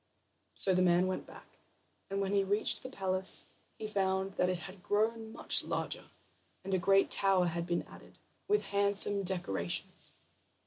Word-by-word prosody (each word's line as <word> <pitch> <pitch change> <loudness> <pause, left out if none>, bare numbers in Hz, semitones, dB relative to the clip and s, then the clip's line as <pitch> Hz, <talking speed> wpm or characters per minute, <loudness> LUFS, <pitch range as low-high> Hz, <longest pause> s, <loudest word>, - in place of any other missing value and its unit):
So 190 - +1
the 185 - +2
man 180 0 +3
went 185 0 -4
back, - - -14 0.6
and 195 0 -3
when 195 0 -2
he 200 -1 +2
reached 205 +2 +2
the 260 - -8
palace 190 -5 +5 0.3
he 215 - -6
found 190 -2 -1
that 180 -1 0
it 185 - -1
had 190 +1 -11
grown 220 +3 -1
much - - +3
larger, - - -5 0.5
and 195 +1 -5
a 190 - +2
great 195 +2 +2
tower 195 -2 +3
had 170 0 -3
been 175 0 -1
added, - - -16 0.3
with 420 0 +1
handsome 200 0 +1
decorations. 135 - -3
195 Hz, 165 wpm, -32 LUFS, 185-200 Hz, 0.6 s, palace